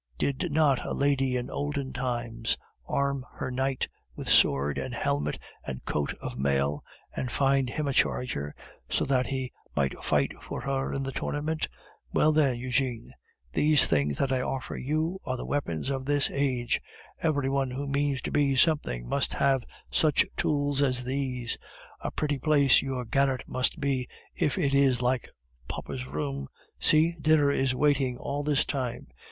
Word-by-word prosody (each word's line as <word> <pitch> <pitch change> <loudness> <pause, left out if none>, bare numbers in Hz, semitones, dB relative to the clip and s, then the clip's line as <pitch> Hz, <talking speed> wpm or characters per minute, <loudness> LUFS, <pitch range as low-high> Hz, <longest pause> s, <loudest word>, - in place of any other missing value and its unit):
Did 140 - -1
not 145 -3 +3
a - - -3
lady 135 -2 +2
in 125 - -4
olden 145 -2 -3
times 120 -3 -1 0.3
arm 140 -1 0
her 130 - -4
knight 130 +1 0 0.3
with - - -7
sword 70 +1 +4
and - - -4
helmet 75 +1 -1 0.3
and 65 -2 -6
coat 75 -1 -1
of - - -6
mail, 70 +1 +1 0.3
and 125 - -3
find 135 -1 +2
him 150 +3 -2
a 140 - 0
charger, 75 - 0 0.3
so - - +1
that 130 -2 +2
he 130 -2 -3 0.2
might 70 -2 -1
fight - - +2
for - - -5
her 135 +1 -1
in 135 - -2
the 135 - -3
tournament? 150 +4 -2 0.4
Well, 155 - +4
then, 145 -5 +3
Eugene, 125 -1 -1 0.4
these 150 -1 +6
things 75 -2 +1
that 135 - +1
I 130 -1 +2
offer 130 0 -3
you 155 +7 -1
are 130 - -2
the - - -5
weapons 135 - -1
of 135 -1 -3
this 145 0 +2
age; 130 -4 0 0.4
every 145 -4 +1
one 135 -1 +1
who 135 +3 -4
means 140 -1 0
to - - -3
be 140 -2 +2
something 130 - +2
must - - 0
have 135 -2 +2 0.3
such 155 -3 +3
tools 145 -1 +1
as 130 -3 +2
these. 125 -2 -2 0.4
A - - -3
pretty 145 -2 -1
place 140 -1 +5
your 130 -2 -3
garret 135 +2 +1
must 130 0 0
be 135 -3 0 0.3
if 145 - 0
it 140 -7 +1
is 135 -3 +4
like 125 0 0 0.4
papa's 65 +1 -5
room! 70 -1 -3 0.3
See, 155 +2 +5
dinner 150 -2 +4
is 135 -2 +1
waiting 135 -3 +2
all 140 +3 -3
this 145 -1 +2
time. 125 -4 -3
135 Hz, 165 wpm, -28 LUFS, 125-145 Hz, 0.4 s, these